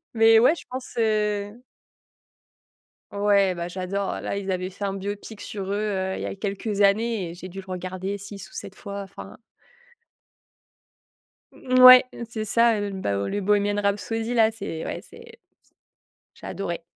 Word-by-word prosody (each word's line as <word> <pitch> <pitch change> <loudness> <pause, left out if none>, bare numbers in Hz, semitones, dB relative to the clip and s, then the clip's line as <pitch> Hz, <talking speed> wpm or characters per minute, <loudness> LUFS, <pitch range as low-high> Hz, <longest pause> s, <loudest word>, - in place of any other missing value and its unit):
Mais 225 0 +6
ouais, 250 +8 +5
je - - -11
pense, 255 0 -7
heu 210 0 0 1.5
Ouais 200 -2 +3
bah, 170 0 -4
j'adore. 185 +2 -3
Là, - - -3
ils 200 -1 -3
avaient 185 0 -2
fait 195 +2 -7
un 195 - -1
biopic 205 +2 -6
sur 195 -2 -6
eux, 200 - 0
heu, 195 -3 -1
il - - -5
y - - -3
a - - -4
quelques 200 +1 -3
années 205 -2 +2
et - - -8
j'ai 180 +1 -9
dû 190 +2 -8
le 190 - -13
regarder 185 +2 -4
6 200 -1 -9
ou - - -23
7 - - -7
fois, 200 +1 -7
enfin 195 0 -11 2.1
Mmh, 255 0 0
ouais, 255 0 +11 0.2
c'est 220 -2 -4
ça, 230 +1 +3
heu, 205 0 -3
bah 190 - -2
heu, 100 0 -2
le 205 - -2
Bohemian 205 +1 +1
Rhapsody 225 +3 -1
là, 225 -2 +5
c'est 190 -7 -6
ouais - - -4
c'est 455 - -15
c'est 465 0 -15 1.0
j'ai - - -12
adoré. 175 -4 -4
200 Hz, 175 wpm, -24 LUFS, 190-220 Hz, 2.1 s, ouais